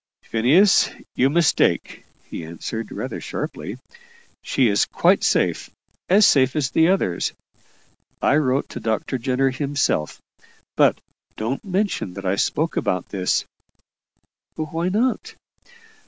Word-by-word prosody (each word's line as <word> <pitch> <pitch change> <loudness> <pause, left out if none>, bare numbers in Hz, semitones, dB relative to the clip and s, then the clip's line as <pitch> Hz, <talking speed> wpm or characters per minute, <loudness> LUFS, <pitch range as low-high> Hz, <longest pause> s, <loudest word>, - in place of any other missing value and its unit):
"Phineas, 150 - +4 0.2
you 130 - +2
mistake," 165 +1 +1 0.2
he - - -8
answered, 85 +8 -6
rather - - -5
sharply. - - -5 0.6
"She 130 - +1
is 100 -2 +2
quite - - +2
safe - - +1 0.4
as 200 +3 +6
safe 130 -1 +4
as 140 -3 0
the 160 0 +4
others. 175 - 0 0.9
I 145 - +3
wrote 135 -2 +1
to - - -7
Dr. 115 +3 -2
Jenner 130 +2 +1
himself. 135 - -1 0.6
But - - +3 0.4
don't 115 +5 -3
mention 190 - -2
that 100 0 -7
I 95 +1 +1
spoke 160 +10 -1
about 90 -2 -1
this." 95 -2 0 1.1
"Why 160 +3 -2
not?" 235 +6 -1
135 Hz, 120 wpm, -22 LUFS, 110-165 Hz, 1.1 s, as